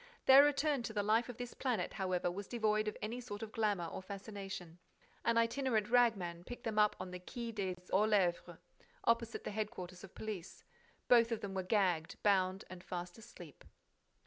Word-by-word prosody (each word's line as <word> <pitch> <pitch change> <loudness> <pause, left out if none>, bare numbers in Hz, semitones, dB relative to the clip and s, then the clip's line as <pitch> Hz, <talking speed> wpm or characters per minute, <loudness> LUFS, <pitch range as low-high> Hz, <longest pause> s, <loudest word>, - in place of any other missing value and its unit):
Their 270 +1 +10
return 290 -1 +2
to 230 -2 -5
the 205 -1 0
life 225 +4 +2
of 245 - -7
this 245 -1 -6
planet, 240 -9 -1
however, 185 -2 -1
was 195 +2 -6
devoid 215 -2 +1
of 215 - -3
any 235 +4 -3
sort 215 -3 -6
of 215 - -7
glamor 205 -6 0
or 165 - -6
fascination. 195 -3 -7 0.4
An 230 0 +2
itinerant 230 -2 +1
rag 245 -2 +5
man 175 -2 -6
picked 245 +5 -8
them 220 -3 0
up 210 0 +4
on 185 0 -6
the 180 - -6
Quai 235 +5 -6
des 195 -4 -2 0.2
Orfèvres, 190 -4 +2 0.5
opposite 230 0 +1
the - - -4
headquarters 200 -4 -5
of 195 - -12
police. 210 -6 -6 0.4
Both 235 -1 +6
of 230 - -1
them 195 -1 -5
were 190 - -1
gagged, 180 -4 +1
bound 190 -1 +2
and 185 -1 -10
fast 175 +2 -6
asleep. 175 - -13
210 Hz, 185 wpm, -35 LUFS, 185-230 Hz, 0.5 s, Their